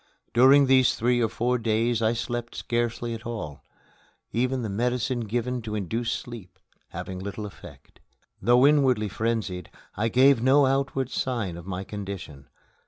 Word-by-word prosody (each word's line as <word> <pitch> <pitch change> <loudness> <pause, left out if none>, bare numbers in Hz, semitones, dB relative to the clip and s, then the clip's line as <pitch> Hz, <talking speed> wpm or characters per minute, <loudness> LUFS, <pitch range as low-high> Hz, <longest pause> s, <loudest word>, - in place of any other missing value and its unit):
During 135 +4 +6
these 130 -1 +4
three 120 +1 +1
or 115 - +2
four 120 +3 0
days 115 +1 +1
I 110 +1 +2
slept 120 0 -4
scarcely 120 0 -2
at 110 -1 -7
all 105 -12 -6 0.7
even 125 +2 0
the - - -2
medicine 125 +4 -1
given 120 +2 -2
to 110 -1 -5
induce 110 +4 -2
sleep 110 -7 -7 0.3
having 95 -1 -6
little 100 +2 -5
effect. 100 - -13 0.4
Though 120 +5 +5
inwardly 130 -8 +3
frenzied, 105 -5 -2 0.3
I 110 +3 0
gave 130 +1 +5
no 135 +3 +5
outward 135 -1 0
sign 115 -9 -2
of 85 +1 -10
my 95 0 -4
condition. 95 -9 -7
115 Hz, 150 wpm, -26 LUFS, 105-125 Hz, 0.7 s, During